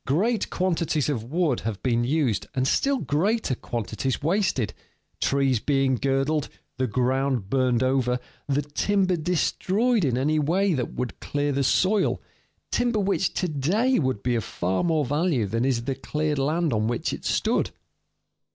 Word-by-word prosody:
Great 210 Hz, -, +1 dB
quantities 165 Hz, -5 st, 0 dB
of 125 Hz, -7 st, -1 dB
wood 160 Hz, +7 st, 0 dB
have 110 Hz, -3 st, -5 dB
been 120 Hz, -2 st, +1 dB
used 135 Hz, -4 st, 0 dB
and 130 Hz, 0 st, +1 dB
still 275 Hz, -, +2 dB
greater 200 Hz, -, 0 dB
quantities 120 Hz, +2 st, -3 dB
wasted, 165 Hz, -, +1 dB, 0.5 s
trees 135 Hz, -3 st, +2 dB
being 135 Hz, +1 st, +1 dB
girdled, 135 Hz, +4 st, 0 dB, 0.3 s
the 130 Hz, -, +1 dB
ground 125 Hz, -2 st, 0 dB
burned 130 Hz, -2 st, +2 dB
over, 130 Hz, -1 st, +1 dB, 0.3 s
the 145 Hz, +1 st, +1 dB
timber 185 Hz, +6 st, +1 dB
destroyed 190 Hz, +7 st, +1 dB
in 125 Hz, -5 st, +1 dB
any 150 Hz, +4 st, +1 dB
way 180 Hz, +6 st, +2 dB
that 125 Hz, -5 st, -3 dB
would 125 Hz, -2 st, -4 dB
clear 145 Hz, 0 st, -1 dB
the 140 Hz, 0 st, 0 dB
soil 190 Hz, +9 st, +2 dB, 0.5 s
timber 240 Hz, -2 st, +1 dB
which 195 Hz, -2 st, +1 dB
to 180 Hz, -, 0 dB
day 185 Hz, -, +1 dB
would 130 Hz, -8 st, -1 dB
be 125 Hz, -, +1 dB
of 115 Hz, -, 0 dB
far 95 Hz, +2 st, -1 dB
more 160 Hz, -4 st, +1 dB
value 145 Hz, -, +1 dB
than 115 Hz, +4 st, -1 dB
is 125 Hz, -3 st, +1 dB
the 135 Hz, +2 st, -1 dB
cleared 150 Hz, +1 st, -2 dB
land 155 Hz, +2 st, +1 dB
on 110 Hz, 0 st, +1 dB
which 120 Hz, 0 st, -1 dB
it -, -, -6 dB
stood. -, -, +1 dB
140 Hz, 160 wpm, -25 LUFS, 125-175 Hz, 0.5 s, still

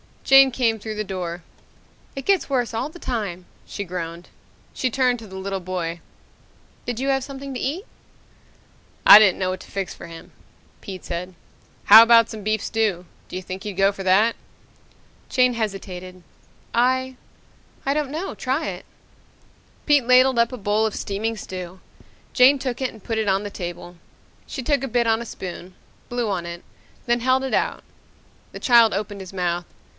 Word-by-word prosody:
Jane 270 Hz, 0 st, +7 dB
came 235 Hz, -3 st, 0 dB
through 215 Hz, +1 st, -6 dB
the 215 Hz, -, -2 dB
door. 180 Hz, -3 st, -5 dB, 0.7 s
"It 270 Hz, -1 st, -6 dB
gets 390 Hz, -6 st, +2 dB
worse 245 Hz, -4 st, 0 dB
all 225 Hz, +6 st, -2 dB
the 320 Hz, -, -13 dB
time," 200 Hz, -, -4 dB, 0.2 s
she 205 Hz, -, -5 dB
groaned. 175 Hz, -2 st, -6 dB, 0.4 s
She 255 Hz, -, -1 dB
turned 250 Hz, -1 st, +1 dB
to 225 Hz, -, -11 dB
the 190 Hz, -, -11 dB
little 195 Hz, 0 st, -4 dB
boy. 175 Hz, -2 st, -4 dB, 0.9 s
"Did 245 Hz, -1 st, -3 dB
you 270 Hz, +1 st, -1 dB
have 270 Hz, -1 st, +1 dB
something 275 Hz, 0 st, -7 dB
to 250 Hz, -, -4 dB
eat?" 320 Hz, +9 st, -3 dB, 1.2 s
"I 205 Hz, -, +12 dB
didn't 205 Hz, -4 st, +4 dB
know 185 Hz, -1 st, 0 dB
what 185 Hz, 0 st, -3 dB
to -, -, -14 dB
fix 195 Hz, -2 st, -4 dB
for -, -, -11 dB
him," 165 Hz, 0 st, -12 dB, 0.5 s
Pete 190 Hz, -2 st, -9 dB
said. 180 Hz, +1 st, -5 dB, 0.5 s
"How 220 Hz, +2 st, +11 dB
about 230 Hz, -1 st, +6 dB
some 215 Hz, -2 st, -8 dB
beef 215 Hz, 0 st, 0 dB
stew? 210 Hz, -6 st, -1 dB, 0.2 s
Do -, -, -9 dB
you 185 Hz, -, -3 dB
think 185 Hz, +1 st, -7 dB
he'd 210 Hz, -, -5 dB
go 195 Hz, +1 st, +3 dB
for 195 Hz, -1 st, -8 dB
that?" 200 Hz, +5 st, +3 dB, 0.9 s
Jane 250 Hz, -1 st, +3 dB
hesitated. 185 Hz, -5 st, -5 dB, 0.5 s
"I 260 Hz, +2 st, +1 dB, 0.7 s
I 275 Hz, -, +2 dB
don't 295 Hz, -2 st, -1 dB
know. 320 Hz, +7 st, -4 dB
Try 270 Hz, +5 st, -2 dB
it." -, -, -8 dB, 1.0 s
Pete 290 Hz, -5 st, +3 dB
ladled 255 Hz, 0 st, +5 dB
up 235 Hz, +1 st, +3 dB
a -, -, -5 dB
bowl 210 Hz, +1 st, +1 dB
of 220 Hz, -, -2 dB
steaming 220 Hz, +3 st, -3 dB
stew. 185 Hz, -3 st, -8 dB, 0.5 s
Jane 265 Hz, +2 st, +6 dB
took 260 Hz, -1 st, -4 dB
it 260 Hz, -, 0 dB
and 220 Hz, -3 st, -16 dB
put 225 Hz, -, -3 dB
it 220 Hz, -1 st, -1 dB
on 195 Hz, +1 st, +1 dB
the 205 Hz, -, -6 dB
table. 175 Hz, -1 st, -7 dB, 0.5 s
She 265 Hz, -, -6 dB
took 280 Hz, 0 st, +1 dB
a -, -, -1 dB
bit 240 Hz, -1 st, +1 dB
on 225 Hz, 0 st, +2 dB
a -, -, -6 dB
spoon, 185 Hz, -3 st, -8 dB, 0.3 s
blew 240 Hz, -2 st, -2 dB
on 180 Hz, -4 st, -2 dB
it, 170 Hz, 0 st, -8 dB, 0.4 s
then 240 Hz, 0 st, +1 dB
held 260 Hz, +2 st, +2 dB
it 265 Hz, -, -3 dB
out. -, -, 0 dB, 0.7 s
The -, -, -7 dB
child 235 Hz, -3 st, +5 dB
opened 205 Hz, 0 st, -4 dB
his 190 Hz, 0 st, -10 dB
mouth. 175 Hz, -2 st, -1 dB
220 Hz, 180 wpm, -22 LUFS, 185-255 Hz, 1.2 s, I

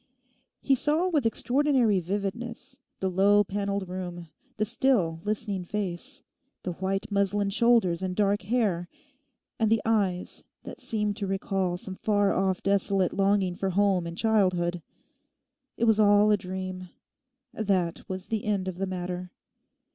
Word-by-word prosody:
He 275 Hz, -, +3 dB
saw 300 Hz, +7 st, +2 dB
with 300 Hz, -9 st, +2 dB
extraordinary 250 Hz, -4 st, +2 dB
vividness 230 Hz, -, -5 dB, 0.2 s
the 190 Hz, -, -1 dB
low 200 Hz, +3 st, +4 dB
panelled 200 Hz, -1 st, -2 dB
room; 175 Hz, -2 st, -6 dB, 0.3 s
the 215 Hz, -, +1 dB
still 215 Hz, -8 st, +1 dB
listening 210 Hz, -3 st, -2 dB
face; 205 Hz, +7 st, -4 dB, 0.4 s
the 180 Hz, -, -2 dB
white 195 Hz, +4 st, -3 dB
muslin 200 Hz, 0 st, +1 dB
shoulders 220 Hz, -6 st, +3 dB
and 185 Hz, -1 st, -2 dB
dark 205 Hz, 0 st, +2 dB
hair; 195 Hz, -5 st, 0 dB, 0.7 s
and 220 Hz, -2 st, +2 dB
the 225 Hz, 0 st, +3 dB
eyes 200 Hz, -5 st, 0 dB, 0.2 s
that -, -, -9 dB
seemed 215 Hz, -5 st, -1 dB
to 200 Hz, -3 st, -3 dB
recall 190 Hz, -2 st, -1 dB
some 190 Hz, +1 st, -6 dB
far 205 Hz, 0 st, +1 dB
off 190 Hz, -1 st, 0 dB
desolate 195 Hz, -1 st, +2 dB
longing 195 Hz, -2 st, +2 dB
for 190 Hz, +2 st, -2 dB
home 190 Hz, -2 st, +2 dB
and 170 Hz, 0 st, -7 dB
childhood. 185 Hz, -6 st, +1 dB, 1.0 s
It -, -, -2 dB
was 220 Hz, -2 st, +4 dB
all 205 Hz, 0 st, +5 dB
a -, -, +6 dB
dream. 185 Hz, -1 st, -6 dB, 0.6 s
That 190 Hz, -5 st, 0 dB
was 185 Hz, 0 st, -5 dB
the 220 Hz, -2 st, -2 dB
end 200 Hz, -3 st, 0 dB
of 185 Hz, -1 st, -5 dB
the 195 Hz, -, -1 dB
matter. 180 Hz, 0 st, -4 dB
200 Hz, 145 wpm, -27 LUFS, 185-215 Hz, 1.0 s, a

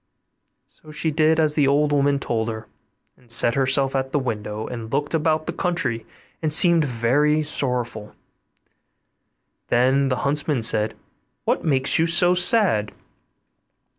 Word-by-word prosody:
So 155 Hz, -, -18 dB
she 155 Hz, +1 st, -2 dB
did 155 Hz, +1 st, +2 dB
as 155 Hz, -2 st, +2 dB
the 145 Hz, -2 st, +1 dB
old 145 Hz, +2 st, +1 dB
woman 140 Hz, 0 st, +1 dB
told 115 Hz, -4 st, -3 dB
her, 110 Hz, 0 st, -7 dB, 0.5 s
and 120 Hz, -2 st, -6 dB
set 120 Hz, 0 st, +4 dB
herself 135 Hz, +1 st, +1 dB
at 135 Hz, 0 st, -2 dB
the 150 Hz, -, 0 dB
window, 110 Hz, -4 st, -4 dB
and 115 Hz, -2 st, -8 dB
looked 145 Hz, +2 st, -2 dB
about 155 Hz, -1 st, 0 dB
the -, -, -4 dB
country 140 Hz, -11 st, -3 dB, 0.3 s
and 155 Hz, -2 st, -1 dB
seemed 170 Hz, +1 st, +4 dB
very 145 Hz, +5 st, +1 dB
sorrowful; 125 Hz, -7 st, -3 dB, 1.5 s
then 130 Hz, +3 st, +2 dB
the 130 Hz, -, 0 dB
huntsman 145 Hz, -3 st, -1 dB
said, 110 Hz, -1 st, 0 dB, 0.5 s
'What -, -, -1 dB
makes 135 Hz, -2 st, +2 dB
you 165 Hz, -, +2 dB
so 175 Hz, +1 st, +3 dB
sad? 180 Hz, -, +2 dB
140 Hz, 140 wpm, -21 LUFS, 120-155 Hz, 1.5 s, set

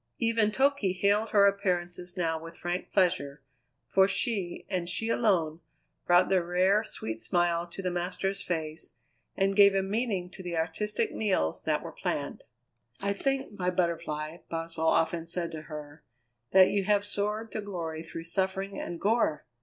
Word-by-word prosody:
Even 230 Hz, -2 st, +2 dB
Toky 265 Hz, -6 st, +2 dB
hailed 205 Hz, +3 st, +2 dB
her 200 Hz, -1 st, +5 dB
appearances 180 Hz, -2 st, -1 dB
now 165 Hz, -2 st, 0 dB
with 165 Hz, +1 st, -10 dB
frank 175 Hz, +1 st, -3 dB
pleasure, 145 Hz, -7 st, +1 dB, 0.4 s
for 190 Hz, +6 st, +4 dB
she, 200 Hz, -4 st, -1 dB
and 180 Hz, -3 st, -2 dB
she 225 Hz, +5 st, -1 dB
alone, 175 Hz, -9 st, +2 dB, 0.5 s
brought 175 Hz, +1 st, +6 dB
the 190 Hz, -2 st, +3 dB
rare, 185 Hz, +5 st, +3 dB
sweet 110 Hz, -, -5 dB
smile 170 Hz, +8 st, +1 dB
to 185 Hz, +3 st, -8 dB
the 180 Hz, -, 0 dB
master's 185 Hz, +3 st, -2 dB
face 160 Hz, -2 st, -4 dB, 0.4 s
and 195 Hz, 0 st, +2 dB
gave 200 Hz, -1 st, +7 dB
a 195 Hz, -, +2 dB
meaning 200 Hz, -2 st, -1 dB
to 185 Hz, -, -10 dB
the 175 Hz, -2 st, -4 dB
artistic 175 Hz, +6 st, -1 dB
meals 190 Hz, -, 0 dB
that -, -, +1 dB
were -, -, -6 dB
planned. -, -, -3 dB, 0.6 s
"I 200 Hz, 0 st, 0 dB
think, 270 Hz, -1 st, -2 dB
my 180 Hz, 0 st, +1 dB
Butterfly," 165 Hz, -3 st, -1 dB
Boswell 165 Hz, 0 st, -2 dB
often 165 Hz, +1 st, +2 dB
said 170 Hz, 0 st, -3 dB
to 160 Hz, -2 st, -6 dB
her, 150 Hz, 0 st, -8 dB, 0.5 s
"that 190 Hz, 0 st, +7 dB
you 200 Hz, -1 st, +1 dB
have 205 Hz, 0 st, +3 dB
soared 210 Hz, +2 st, -2 dB
to 215 Hz, -, -3 dB
glory 170 Hz, -6 st, -4 dB
through 165 Hz, 0 st, -7 dB
suffering 190 Hz, +3 st, -2 dB
and 170 Hz, -, -5 dB
gore! 205 Hz, -8 st, +1 dB
180 Hz, 160 wpm, -29 LUFS, 165-200 Hz, 0.6 s, gave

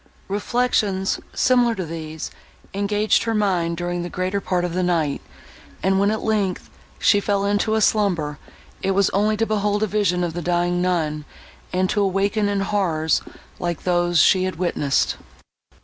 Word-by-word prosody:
Reflections, 205 Hz, -2 st, 0 dB
similar 245 Hz, -2 st, +3 dB
to 185 Hz, -, -3 dB
these, 160 Hz, -1 st, -6 dB, 0.4 s
engaged 205 Hz, +2 st, +1 dB
her 225 Hz, -1 st, 0 dB
mind, 180 Hz, -5 st, 0 dB
during 175 Hz, 0 st, -2 dB
the 175 Hz, -, -4 dB
greater 185 Hz, +3 st, -2 dB
part 180 Hz, -2 st, 0 dB
of 175 Hz, -, -4 dB
the 185 Hz, -, 0 dB
night, 165 Hz, -5 st, 0 dB, 0.6 s
and 190 Hz, 0 st, +2 dB
when, 200 Hz, +1 st, +3 dB
at 220 Hz, 0 st, -2 dB
length, 205 Hz, -4 st, -1 dB, 0.3 s
she 205 Hz, -, +4 dB
fell 200 Hz, -1 st, 0 dB
into 205 Hz, +2 st, +1 dB
a 220 Hz, -, +1 dB
slumber, 175 Hz, -9 st, +1 dB, 0.4 s
it 195 Hz, 0 st, 0 dB
was 200 Hz, 0 st, +3 dB
only 210 Hz, +2 st, +1 dB
to 225 Hz, -, +1 dB
behold 210 Hz, -1 st, 0 dB
a -, -, +4 dB
vision 195 Hz, -4 st, +1 dB
of 170 Hz, -2 st, -2 dB
the 175 Hz, -, -4 dB
dying 175 Hz, +1 st, 0 dB
nun, 160 Hz, -4 st, 0 dB, 0.5 s
and 185 Hz, +1 st, +1 dB
to 205 Hz, -, 0 dB
awaken 200 Hz, +2 st, +1 dB
in 200 Hz, -1 st, 0 dB
horrors, 170 Hz, -6 st, +1 dB, 0.4 s
like 175 Hz, -2 st, -3 dB
those 175 Hz, -1 st, +1 dB
she 185 Hz, -1 st, +5 dB
had 185 Hz, -, -3 dB
witnessed. 160 Hz, -5 st, 0 dB
190 Hz, 165 wpm, -22 LUFS, 175-205 Hz, 0.6 s, she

